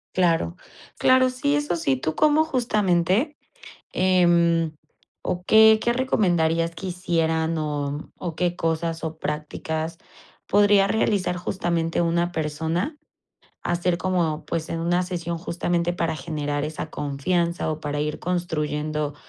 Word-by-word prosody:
Claro, 165 - +2 0.4
claro, 255 0 +4
sí, 275 +3 0
eso 290 -10 -1
sí. 135 -6 0
¿Tú 155 +4 -3
cómo 305 +1 +4
justamente, 215 - +1 0.6
eh, 170 -3 +3 0.5
o 180 0 -3
qué 220 +2 +7
qué 235 - +2
recomendarías 170 -10 +1
que 175 +3 -6
hicieran 165 -2 0
o 145 -1 -3
o 170 -3 -5
qué 175 -1 0
cosas 165 0 -2
o 160 0 -4
prácticas 160 +2 -3 0.5
podría 205 -1 +5
realizar 200 -4 +1
justamente 170 -2 -1
una 170 +1 +1
persona, 160 - -2 0.7
hacer 175 0 0
como 170 -5 0
pues 165 -1 -3
en 165 - -3
una 175 +2 +1
sesión 170 -2 -4
justamente 175 0 -1
para 165 -2 -1
generar 145 -1 -3
esa 155 +1 -5
confianza 170 +4 -1
o 155 - -3
para 145 -1 -3
ir 150 0 -2
construyendo 150 -4 -2
170 Hz, 130 wpm, -24 LUFS, 160-185 Hz, 0.7 s, qué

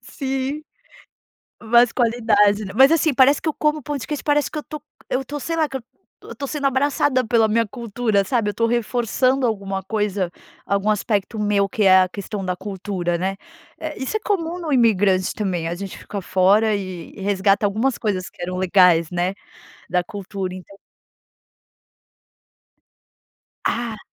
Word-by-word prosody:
Sim. 270 +3 -4 1.0
Mais 235 +1 +4
qualidade, 215 -4 +2
né? 195 - -7
Mas, 265 +3 +7
assim, 320 -2 +2
parece 270 +2 +5
que 320 - -2
eu 305 - -1
como 300 0 0
pão 295 +2 -3
de 265 - -6
queijo, 300 -2 -4
parece 295 -1 +2
que 310 - -5
eu - - -1
estou 300 -2 -8 0.3
eu 255 - 0
estou, 290 +3 -6
sei 330 +4 -3
lá, 315 -2 +1
que 270 - -5
eu - - -4
estou 235 - -31 0.3
eu - - -10
estou 270 +4 -6
sendo 290 -2 -2
abraçada 270 -1 +2
pela 225 -1 +3
minha 225 +1 +1
cultura, 220 -3 -1
sabe? 230 -4 0
Eu - - -1
estou 230 +2 0
reforçando 245 +3 +1
alguma 195 -3 -2
coisa, 205 -3 -2 0.3
algum 200 +1 0
aspecto 210 0 -1
meu 205 -1 +1
que 220 0 -2
é 190 -1 +7
a 185 - 0
questão 200 +1 -6
da 180 -1 -2
cultura, 190 -2 -3
né. 190 +2 -2 0.4
É 315 -1 -5
isso 265 - -2
é - - -2
comum 355 -5 -2
no 325 -4 -4
imigrante 200 -6 +3
também. 180 -6 -2
A 170 - -2
gente 195 +1 -7
fica 200 - -6
fora 200 +4 +3
e 185 -4 -6
e - - -11
resgata 200 +1 +2
algumas 225 +6 0
coisas 190 -5 -2
que - - -20
eram 180 +1 -3
legais, 180 -3 +4
né, 180 +2 -1 0.5
da 180 0 0
cultura, 190 -1 -5
então 185 +2 -12 2.9
Ah. 230 -2 -2
215 Hz, 175 wpm, -21 LUFS, 195-260 Hz, 2.9 s, Mas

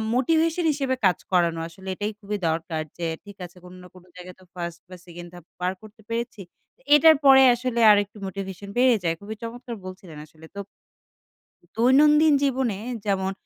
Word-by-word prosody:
Motivation 325 +5 +1
হিসেবে 270 -3 -2
কাজ 180 -3 +3
করানো। 170 -2 +1
আসলে 190 +3 -14
এটাই 210 +2 -3
খুবই 205 0 -4
দরকার। 160 0 -3 0.2
যে 170 - -4 0.2
ঠিক 205 -1 -14
আছে 175 +1 -16
কোন 180 0 -13
না 180 - -13
কোন 180 - -16
জায়গায় 180 0 -11
তো - - -19
ফার্স্ট 170 -1 -6
বা 185 - -10
সেকেন্ড 175 0 -11
ধাপ 175 -2 -13
পার 180 +1 -1
করতে 215 +1 -16
পেরেছি। 230 -2 -4 0.5
এটার 315 +2 +7
পরে 265 -1 +8
আসলে 240 -1 -3
আরেকটু 205 +1 +1
মোটিভেশন 195 0 -7
বেড়ে 250 -1 +4
যায়। 165 -1 0
খুবই 215 +2 -7
চমৎকার 240 +1 -7
বলছিলেন 185 -4 -10
আসলে। 155 +1 -18
তো - - -6 1.2
দৈনন্দিন 295 +5 +5
জীবনে 255 -7 0 0.3
যেমন 190 -1 -1
200 Hz, 170 wpm, -24 LUFS, 180-250 Hz, 1.2 s, পরে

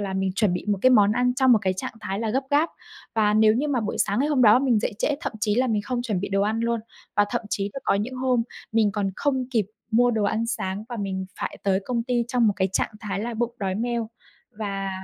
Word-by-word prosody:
là 195 -2 -3
mình 190 -1 0
chuẩn 205 -3 +2
bị 180 - -3
một 205 -1 +1
cái 255 - +6
món 210 -4 +5
ăn 250 +1 +1
trong 260 -1 +4
một 225 - +6
cái 185 -1 +1
trạng 185 - -5
thái 195 -2 -3
là 225 - -1
gấp 265 +5 0
gáp. 295 +3 +3 0.5
Và 210 -2 +3
nếu 215 0 +5
như 280 +6 0
mà 265 -4 +1
buổi 215 -1 -3
sáng 205 +1 +1
ngày 285 +3 +2
hôm 285 -4 +2
đó 220 +1 +7
mình 255 -5 +2
dậy - - -1
trễ 290 - +1
thậm 325 - -3
chí 210 -1 +1
là 255 +3 +2
mình 215 -4 0
không 245 +3 -2
chuẩn 210 -7 -2
bị 200 - -3
đồ 195 0 +1
ăn 220 +2 0
luôn, 235 0 0 0.4
và 205 - +5
thậm 240 +1 -1
chí 200 0 -1
là 270 - -5
có - - +3
những 215 +6 -2
hôm 255 -2 +1 0.3
mình 220 -2 +3
còn 195 -1 -1
không 260 -3 0
kịp 225 -6 +1 0.2
mua 245 +2 +4
đồ 220 -3 0
ăn 220 +3 0
sáng 210 -3 -3
và 240 - -5
mình 190 -2 -3
phải - - -4
tới 195 -1 +2
công 240 -2 -1
ty 240 -1 0
trong 245 -2 +2
một 210 - +4
cái 190 -1 +1
trạng - - 0
thái 200 -2 -3
là 235 +1 -3
bụng 235 +1 -2
đói 190 -2 -1
meo, 235 0 -2 0.4
và 200 -2 -4
220 Hz, 275 wpm, -24 LUFS, 200-245 Hz, 0.5 s, đó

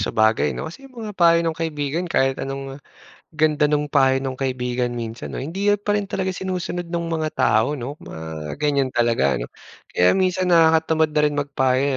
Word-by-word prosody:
sabagay 110 +1 +2
'no, - - -4
kasi 220 +13 -9
'yung 255 - -22
mga 215 -2 -6
payo 170 -2 +4
ng 165 - +1
kaibigan, 160 +2 -2
kahit 135 -4 +1
anong 135 0 -5 0.6
ganda 150 -1 +3
nung 150 -1 0
payo 135 -1 +3
ng 130 -1 -4
kaibigan, 125 -2 -1
minsan 115 -1 -5
'no, - - -4
hindi 190 +8 -3
pa 205 0 -3
rin 205 -1 0
talaga 190 -1 -2
sinusunod 180 -2 -4
ng 170 0 -2
mga 155 - 0
tao 110 +7 +2
'no, 140 +3 -6
mga 80 -1 -7
ganiyan 140 -3 0
talaga 115 -13 +2
ano. - - -5 0.4
Kaya 90 0 +4
minsan 185 -1 +1
nakakatamad 160 -1 +4
na 150 0 +2
rin 145 - -3
magpayo, 135 -2 +1
145 Hz, 180 wpm, -22 LUFS, 130-170 Hz, 0.6 s, payo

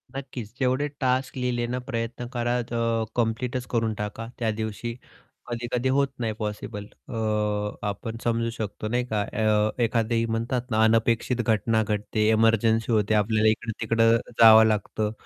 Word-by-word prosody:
नक्कीच. 130 -5 -6
जेवढे 130 +3 +1
टास्क 130 0 0
लिहिले 125 -1 -1
ना, - - -2
प्रयत्न 115 0 -3
करा 120 +1 0
ज - - -4 0.5
कंप्लीटच 120 +2 -2
करून 115 -1 +1
टाका 105 +2 -5
त्या 115 -2 +1
दिवशी. 110 +2 -4 0.5
कधी-कधी 120 +2 -2
होत 140 0 +3
नाही 115 -2 -1
पॉसिबल 105 -1 -5 0.2
अ, 115 - -6 0.7
आपण 110 +3 -4
समजू 115 0 0
शकतो 110 -2 -5
नाही 120 +2 0
का? 110 -4 -1
अ, 110 +2 0
एखादी 115 0 +1
म्हणतात 120 +2 -2
ना, 110 0 +3
अनपेक्षित 115 +2 +2
घटना 110 0 +1
घडते, 105 +1 -1
एमर्जन्सी 115 +1 +3
होते, 110 -1 +2
आपल्याला 110 +1 +3
इकडं-तिकडं 115 +1 +1 0.2
जावं 110 -1 +9
लागतं. 105 0 0
115 Hz, 140 wpm, -25 LUFS, 110-120 Hz, 0.7 s, जावं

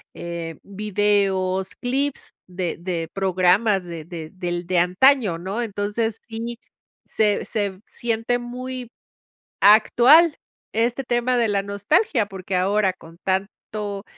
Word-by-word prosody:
eh, 170 -2 -6
videos, 195 -2 0
clips 270 +3 -1 0.2
de 180 -1 -3
de 170 -2 -3
programas 190 +1 +2
de 170 -2 -7
de 165 -3 -7
del 175 -1 -3
de 185 - +1
antaño, 190 +2 +3
¿no? 195 +7 -3
Entonces, 210 +1 -2
sí, 230 +1 -5 0.5
se 210 -2 +1
se 200 -4 -2
siente 230 +1 -1
muy, 250 0 -6 0.7
actual 245 - +6 0.4
este 235 +4 0
tema 245 +1 +1
de 235 - +2
la 200 -2 0
nostalgia, 210 - +1
porque 190 -1 -5
ahora 195 +1 +2
con 165 -1 -16
tanto, 200 +1 -3
205 Hz, 120 wpm, -22 LUFS, 185-235 Hz, 0.7 s, actual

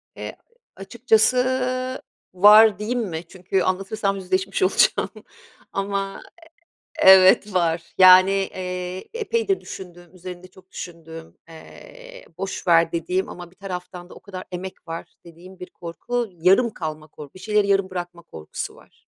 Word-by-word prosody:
Eee, - - -7 0.4
a - - -13
açıkçası 255 +4 +1 0.3
var 210 +2 +7
diyeyim 235 +4 -2
mi? 170 -6 -5
Çünkü 185 +1 -2
anlatırsam 195 +2 -1
yüzleşmiş 190 0 -2
olacağım 185 - +2 0.6
ama, 195 0 -3 0.8
eee, - - +8
evet 190 +2 +6
var. 170 -2 0
Yani, 185 +1 +8
eee, 185 -1 -4
epeydir 455 -3 -1
düşündüğüm, 175 -1 -11
üzerinde 180 0 -10
çok 185 0 -21
düşündüğüm, 165 -1 -10
eee, - - -14
boş 190 0 -5
ver 165 -1 +4
dediğim 180 +3 -2
ama 175 -1 -10
bir - - -25
taraftan 180 -2 -8
da - - -12
o - - -13
kadar 185 -2 -9
emek 185 0 -8
var 165 0 -7
dediğim 175 +3 -15
bir 180 - -9
korku, 235 +8 -4
yarım 185 +7 +3
kalma 155 -2 -6
kor 150 -1 -12
bir 185 - -14
şeyleri 210 +1 +1
yarım 195 -1 +1
bırakma 175 -2 -7
korkusu 80 - -8
var. - - -22
185 Hz, 140 wpm, -22 LUFS, 175-205 Hz, 0.8 s, eee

